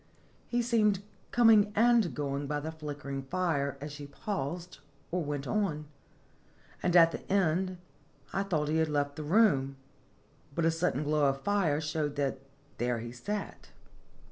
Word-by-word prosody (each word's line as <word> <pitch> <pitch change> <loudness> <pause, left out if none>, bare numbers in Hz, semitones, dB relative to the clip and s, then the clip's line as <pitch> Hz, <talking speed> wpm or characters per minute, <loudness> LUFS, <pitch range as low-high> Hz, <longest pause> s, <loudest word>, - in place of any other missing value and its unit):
He 240 0 0
seemed 210 -4 +2 0.3
coming 220 -3 +5
and 230 -4 +4
going 140 -1 -2
by 145 +1 -1
the 155 +2 -5
flickering 145 -3 -5
fire 140 -2 -1
as 145 +2 -6
she 145 0 -8
paused 175 0 -4 0.3
or 180 0 0
went 145 -1 -3
on; 175 -8 -1 1.0
and, 180 -1 +1
at 165 -1 +8
the - - -7
end, 185 -1 +1 0.6
I 195 - +1
thought 165 -7 0
he 155 - +1
had 160 -1 +2
left 145 -1 0
the 155 - -5
room; 145 -7 +3 0.8
but 170 - +1
a 165 - +4
sudden 165 -3 0
glow 150 -1 +3
of 135 - 0
the 135 - -19
fire 195 -8 +2
showed 150 -1 -2
that 140 -2 -1 0.4
there 120 0 0
he 115 +1 -6
sat. 205 +13 -5
155 Hz, 160 wpm, -30 LUFS, 145-190 Hz, 1.0 s, at